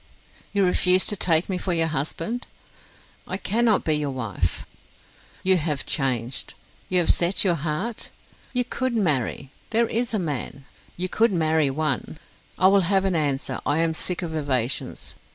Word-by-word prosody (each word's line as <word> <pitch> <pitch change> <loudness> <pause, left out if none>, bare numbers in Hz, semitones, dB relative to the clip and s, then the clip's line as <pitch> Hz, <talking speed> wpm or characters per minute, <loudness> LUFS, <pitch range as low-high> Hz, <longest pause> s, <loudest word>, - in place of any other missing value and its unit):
"You 200 -2 +2
refuse 180 +1 +4
to 205 - 0
take 170 -3 +2
me 185 -2 -2
for 180 0 -1
your 165 -1 +2
husband?" 165 - -3 0.8
"I 185 - -2
cannot 220 +3 +2
be 155 - +1
your 150 -1 0
wife." 115 -9 -2 0.8
"You 190 0 +5
have 150 -4 -1
changed?... 125 -3 -1 0.3
you 185 - +3
have 175 -2 +5
set 175 +2 +2
your 185 -3 +3
heart?... 165 +9 -3 0.4
you 250 -1 +2
could 255 0 -2
marry?... 140 - 0 0.2
there 230 +1 +3
is 230 +2 -1
a 220 - 0
man?... 145 -5 -3 0.3
you 180 +1 -1
could 225 +4 +2
marry 160 -4 +2
one! 150 +1 -2 0.4
I - - +2
will 195 +1 +6
have 195 -1 +3
an 190 -2 +1
answer, 145 -4 -1
I 145 - +1
am 165 0 +1
sick 180 +3 -2
of 160 -2 -4
evasions. 135 -5 -2
165 Hz, 165 wpm, -24 LUFS, 145-195 Hz, 0.8 s, will